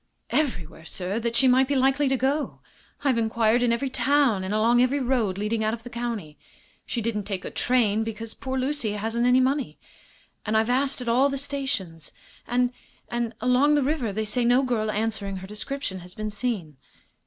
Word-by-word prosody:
"Everywhere, 175 - -1
sir, 185 +6 -3
that 235 0 -2
she 265 - +5
might 260 +1 +5
be 285 - 0
likely 270 +2 +3
to 265 0 +2
go. 275 +4 -1 0.4
I've 265 -5 +2
inquired 225 +1 +2
in 245 -1 +3
every 260 +3 -1
town, 270 -8 +2
and 190 - -3
along 230 +3 +3
every 260 +3 +2
road 240 -7 0
leading 215 +2 -1
out 215 +1 +1
of 230 - -15
the 245 - -9
county. 225 -11 -4 0.5
She 235 - -2
didn't 210 -2 -2
take 195 -3 -4
a - - -5
train, 225 -4 +2
because 225 0 -5
poor 265 -1 -4
Lucy 260 -5 -1
hadn't 225 +3 0
any 250 +1 +5
money 265 +1 0 0.7
and 215 0 +1
I've 220 +2 +2
asked 265 +1 +1
at 250 - -6
all 255 +4 +4
the 275 - -2
stations. 265 - -3 0.3
And 245 +1 +1 0.4
and 235 -1 -2
along 255 +5 +4
the 290 - +2
river 265 -6 0
they 215 +2 -2
say 240 +4 +1
no 245 +3 +4
girl 230 -4 0
answering 210 -2 -2
her 190 0 -7
description 210 0 -5
has 180 +1 -13
been 215 0 -4
seen." 205 - -3
235 Hz, 195 wpm, -25 LUFS, 215-260 Hz, 0.7 s, she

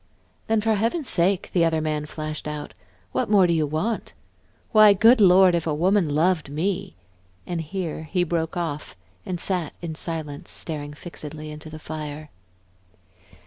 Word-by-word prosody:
"Then, 220 -1 +2
for 220 +1 +2
Heaven's 230 - 0
sake," 180 +2 +1
the 175 - +4
other 165 -1 +2
man 155 -1 -2
flashed 155 0 -5
out, 150 -1 -5 0.4
"what - - -1
more 200 -3 +6
do 170 - +2
you 155 -2 +1
want? 160 +10 -2 0.6
Why, 215 -1 +8
good 225 +4 +6
Lord, 185 -1 +7
if 170 -1 0
a 150 - 0
woman 180 +1 +2
loved 160 -1 +2
me!" 165 - -2 0.5
and 175 -2 -3
here 160 -2 -5
he 180 -2 +2
broke 165 0 -2
off 155 -4 -4 0.3
and 180 -2 -3
sat 180 -4 -1
in 170 -2 -5
silence, 155 -3 -5
staring 145 -3 -6
fixedly 155 -1 -8
into 150 +1 -9
the 155 - -8
fire. 155 -1 -7
165 Hz, 160 wpm, -24 LUFS, 155-185 Hz, 0.6 s, Why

